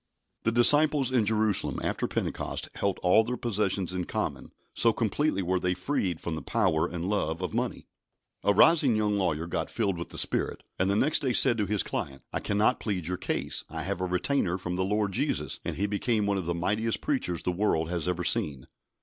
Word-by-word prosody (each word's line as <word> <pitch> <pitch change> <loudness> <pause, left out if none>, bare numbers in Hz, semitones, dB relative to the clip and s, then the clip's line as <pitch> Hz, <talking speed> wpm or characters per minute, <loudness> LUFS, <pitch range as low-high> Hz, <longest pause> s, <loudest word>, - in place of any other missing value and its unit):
The 115 - +1
disciples 145 +3 +4
in 120 -5 +2
Jerusalem 110 -2 +2
after - - -1
Pentecost - - -3
held 100 -1 -1
all 95 +5 +5
their 125 +2 -3
possessions 100 -5 -1
in 90 -1 -2
common, - - -3 0.2
so 115 -1 +3
completely 115 0 0
were 90 +1 0
they 90 0 0
freed 90 - -1
from 85 - -4
the 80 - -4
power 80 +2 +1
and 85 +1 -4
love 85 -6 -1
of 90 -3 -4
money. - - -2 0.6
A 100 - +4
rising 135 - +5
young 105 -1 +1
lawyer 85 -4 0
got 85 - -3
filled 95 -4 -1
with 85 - -6
the - - -9
Spirit, - - -1 0.2
and 95 +1 +2
the 100 - +2
next 150 +8 +3
day 130 -3 0
said 120 -3 +5
to 105 - 0
his 105 -1 +1
client: 70 0 -5
"I - - 0
cannot 105 +4 +1
plead 95 -6 -3
your 90 +2 -2
case. - - -2
I - - -4
have 90 - -3
a - - 0
retainer 90 +1 0
from 90 -1 -4
the 95 - 0
Lord 105 +1 0
Jesus"; - - -1
and - - -3
he 100 - 0
became 105 +1 0
one 100 -1 0
of 85 - -5
the 85 - -1
mightiest 105 +6 -1
preachers 90 - -1
the 90 - 0
world 85 -4 0
has 85 -1 -2
ever 90 0 -1
seen. 70 -6 +1
100 Hz, 210 wpm, -28 LUFS, 90-110 Hz, 0.6 s, all